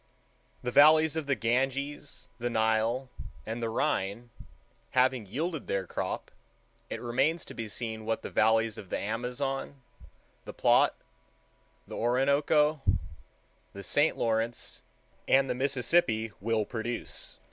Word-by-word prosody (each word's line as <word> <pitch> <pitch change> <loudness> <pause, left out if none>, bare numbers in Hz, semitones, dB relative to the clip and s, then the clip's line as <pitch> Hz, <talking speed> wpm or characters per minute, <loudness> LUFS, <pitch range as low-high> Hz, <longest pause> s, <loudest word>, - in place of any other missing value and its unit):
The 125 - -2
valleys 155 +3 +6
of 160 -3 -3
the 140 - +2
Ganges, 135 +5 -2
the 120 +1 -1
Nile, 110 +3 +1 0.4
and 115 +2 -4
the 115 - -1
Rhine, 110 +1 -1 0.7
having 125 -4 +3
yielded 155 - -3
their 95 -1 -1
crop, - - -4 0.6
it - - -4
remains 135 +8 0
to - - -8
be 115 -1 -5
seen 110 0 -5
what 110 +1 -2
the - - -6
valleys 110 0 +2
of 95 - -10
the - - -1
Amazon, 125 +5 -3 0.6
the - - -8
Plate, - - +4 0.9
the - - -7
Orinoco, 140 +5 +2 0.9
the 100 - -8
St. 145 +8 +2
Lawrence, 115 +1 -1 0.5
and 135 0 +4
the 125 - 0
Mississippi 125 -3 +1
will 110 0 +1
produce. 120 +1 -4
120 Hz, 125 wpm, -29 LUFS, 110-140 Hz, 0.9 s, valleys